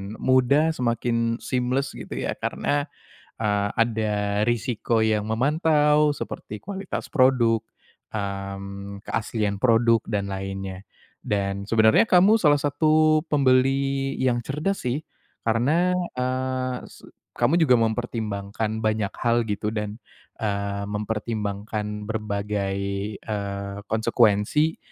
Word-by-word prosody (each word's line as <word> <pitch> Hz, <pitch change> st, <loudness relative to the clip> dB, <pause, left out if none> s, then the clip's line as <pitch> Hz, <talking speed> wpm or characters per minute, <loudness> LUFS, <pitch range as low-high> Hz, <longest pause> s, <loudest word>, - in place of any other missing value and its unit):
mudah, 130 Hz, +5 st, +3 dB
semakin 115 Hz, -3 st, 0 dB
seamless, 130 Hz, +2 st, -1 dB
gitu -, -, -8 dB
ya, -, -, -2 dB
karena, 145 Hz, +1 st, -1 dB, 0.5 s
eee, 105 Hz, -2 st, +1 dB
ada 105 Hz, -3 st, +1 dB
risiko 120 Hz, 0 st, 0 dB
yang 110 Hz, -1 st, +2 dB
memantau 150 Hz, +4 st, +3 dB
seperti 110 Hz, -6 st, -6 dB
kualitas 195 Hz, -, -5 dB
produk, 125 Hz, -5 st, +3 dB, 0.5 s
mmm, 100 Hz, -1 st, -5 dB
keaslian 105 Hz, -3 st, -2 dB
produk 115 Hz, -2 st, +4 dB
dan 100 Hz, -1 st, -1 dB
lainnya. 95 Hz, -1 st, -5 dB, 0.4 s
Dan 100 Hz, -1 st, -1 dB
sebenernya 110 Hz, -1 st, +5 dB
kamu 190 Hz, +4 st, +6 dB
salah 150 Hz, -9 st, +4 dB
satu 155 Hz, +2 st, +3 dB
pembeli 135 Hz, 0 st, +2 dB
yang 120 Hz, -2 st, +1 dB
cerdas 150 Hz, +10 st, -2 dB
sih, 125 Hz, +3 st, -1 dB, 0.5 s
karena, 155 Hz, +11 st, +2 dB, 0.2 s
eee, 130 Hz, 0 st, -1 dB
se -, -, -15 dB, 0.3 s
kamu 140 Hz, +9 st, +2 dB
juga 140 Hz, -7 st, +5 dB
mempertimbangkan 110 Hz, -2 st, -1 dB
banyak 110 Hz, -2 st, 0 dB
hal, 120 Hz, 0 st, +2 dB
gitu, 105 Hz, 0 st, -3 dB
dan, 105 Hz, +1 st, -4 dB, 0.4 s
eee, 100 Hz, -2 st, -2 dB
mempertimbangkan 105 Hz, 0 st, -3 dB
berbagai, 100 Hz, -2 st, -2 dB, 0.4 s
eee, 100 Hz, -1 st, -4 dB
konsekuensi 115 Hz, +6 st, +2 dB
115 Hz, 105 wpm, -24 LUFS, 105-130 Hz, 0.5 s, kamu